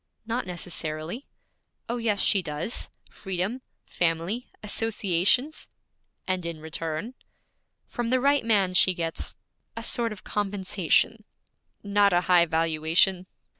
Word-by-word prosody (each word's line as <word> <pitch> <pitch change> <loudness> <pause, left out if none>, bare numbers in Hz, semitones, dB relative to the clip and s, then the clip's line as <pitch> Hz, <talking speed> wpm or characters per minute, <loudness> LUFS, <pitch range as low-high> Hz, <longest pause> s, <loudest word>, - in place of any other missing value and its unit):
'Not 230 -1 -2
necessarily.' 175 - -4 0.6
'Oh, 240 - -2
yes 220 -4 0
she 200 - +5
does: 155 +6 -1 0.2
freedom, 190 +6 -3 0.2
family, 170 +8 -1 0.2
associations.' 210 - +1 0.6
'And 185 -1 -1
in 170 -2 -5
return?' 160 +7 -4 0.7
'From 240 -1 -4
the 255 +1 +3
right 280 +1 +3
man 200 -5 +2
she 185 0 +5
gets 165 -1 -2 0.4
a 230 - -4
sort 235 -1 0
of 210 - -9
compensation.' 205 +1 0 0.6
'Not 200 -1 +3
a 175 - +4
high 175 -1 +5
valuation.' 165 +3 +2
190 Hz, 115 wpm, -26 LUFS, 170-225 Hz, 0.7 s, she